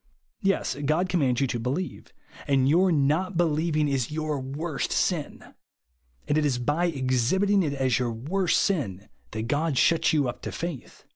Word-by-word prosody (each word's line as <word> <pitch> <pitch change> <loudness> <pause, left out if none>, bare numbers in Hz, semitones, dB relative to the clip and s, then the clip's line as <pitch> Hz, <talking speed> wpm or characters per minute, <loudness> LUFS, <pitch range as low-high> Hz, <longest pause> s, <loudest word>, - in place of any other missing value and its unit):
Yes, 195 -1 0
God 160 +6 +1
commands 140 -8 +1
you - - +3
to 120 -2 -2
believe; 135 +10 -4 0.4
and 135 -2 +3
your 180 +6 +4
not 160 +5 +1
believing 155 -2 +1
is 135 -4 -1
your 155 -2 -2
worst 140 +4 -4
sin; 165 -6 -2 0.7
and 145 - +1
it - - 0
is 140 -4 +1
by 145 +8 0
exhibiting 150 - +1
it 150 -5 -1
as 130 -3 +1
your 120 -2 -1
worst 165 +11 0
sin, 105 - -1 0.2
that 110 0 -4
God 145 +5 0
eliuts 165 +5 +3
you 145 -4 +2
up 120 - -5
to - - -5
f - - -7
dth. 165 -7 -6
150 Hz, 170 wpm, -26 LUFS, 130-170 Hz, 0.7 s, your